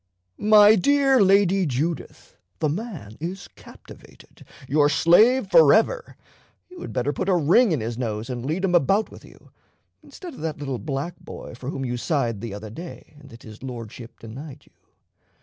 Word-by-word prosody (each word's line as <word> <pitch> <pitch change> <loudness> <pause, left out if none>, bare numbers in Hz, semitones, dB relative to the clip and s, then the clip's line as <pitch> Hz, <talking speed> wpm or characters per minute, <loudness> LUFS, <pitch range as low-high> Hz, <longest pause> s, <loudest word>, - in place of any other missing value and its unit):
"My 210 0 +6
dear 270 +4 +3
Lady 195 -1 +3
Judith, 150 +6 -4 0.2
the 155 - 0
man 160 - -6
is 180 +5 -6
captivated - - -17 0.2
your 145 +2 +3
slave 210 - +4
forever. 220 - +4 0.5
You 360 - -11
had - - -7
better 130 +3 -1
put 185 - -3
a 185 - +3
ring 175 - +3
in 150 -7 0
his 115 +2 -5
nose 110 -2 -3
and 125 -2 -5
lead 160 +8 -2
him 180 - -1
about 195 +6 +2
with - - -14
you, - - -18 0.5
instead 355 -4 -11
of - - -13
that 160 -1 -4
little 135 -4 -5
black 150 +4 -5
boy - - -10
for 125 +2 -8
whom 135 -2 -4
you 125 -1 -3
sighed 120 -4 -2
the 115 - -6
other 105 +1 -9
day, 165 +2 -10
and 140 -1 -16
that 115 -2 -15
his 110 -1 -13
Lordship 115 -2 -9
denied 130 +6 -10
you. - - -27
155 Hz, 175 wpm, -23 LUFS, 125-195 Hz, 0.5 s, My